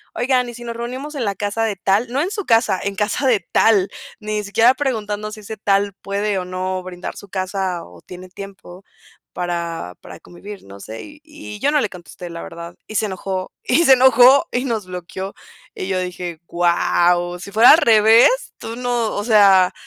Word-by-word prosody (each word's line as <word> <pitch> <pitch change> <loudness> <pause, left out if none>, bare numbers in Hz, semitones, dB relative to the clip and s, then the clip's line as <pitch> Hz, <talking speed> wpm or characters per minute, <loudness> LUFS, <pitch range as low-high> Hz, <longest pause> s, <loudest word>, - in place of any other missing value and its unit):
oigan, 250 0 +1
y - - -8
¿sí 240 - -10
nos 235 -1 -6
reunimos 260 +6 -6
en 260 -5 -2
la 200 -1 -1
casa 205 +3 -2
de 215 -2 -2
tal? 195 +6 +1
No 270 +3 0
en 360 +5 -2
su 410 -3 -4
casa, 225 -5 +2
en 200 0 -3
casa 210 +6 -1
de 230 -6 +3
tal, 200 -4 +3 0.3
ni 210 0 -3
siquiera 225 +5 +4
preguntando 215 -6 -3
si 215 - -9
ese 215 +1 -8
tal 200 0 +1
puede, 200 +1 -2
o 180 - -5
no 185 0 -3
brindar 180 -1 -7
su 200 - -12
casa 185 -1 -3
o 85 -1 -16
tiene 185 0 -11
tiempo 190 -1 -11 0.5
para 170 - -4
para - - -12
convivir, 200 +3 -11
no 100 0 -13
sé. 110 +3 -9
Y 295 0 -14
y 300 -9 -10
yo 275 - +1
no 300 - +3
le 210 - -1
contesté 180 -1 -11
la 170 0 -7
verdad 170 +1 -9
y 215 - -9
se 215 - +1
enojó 190 -1 -5
y 320 +7 +2
se 270 - +8
enojó 260 +1 +6
y 250 +2 -1
nos 220 -6 -3
bloqueó. 185 +2 -7 0.4
Y 185 - -5
yo 190 -1 -1
dije 180 -2 -5
guau, 175 0 +1
si 200 - -9
fuera 225 +4 +6
al 305 - +8
revés, 230 - +4
tú 225 - -7
no, 245 -3 -1
o 205 - -2
sea. 195 -4 +5
205 Hz, 200 wpm, -19 LUFS, 185-235 Hz, 0.5 s, se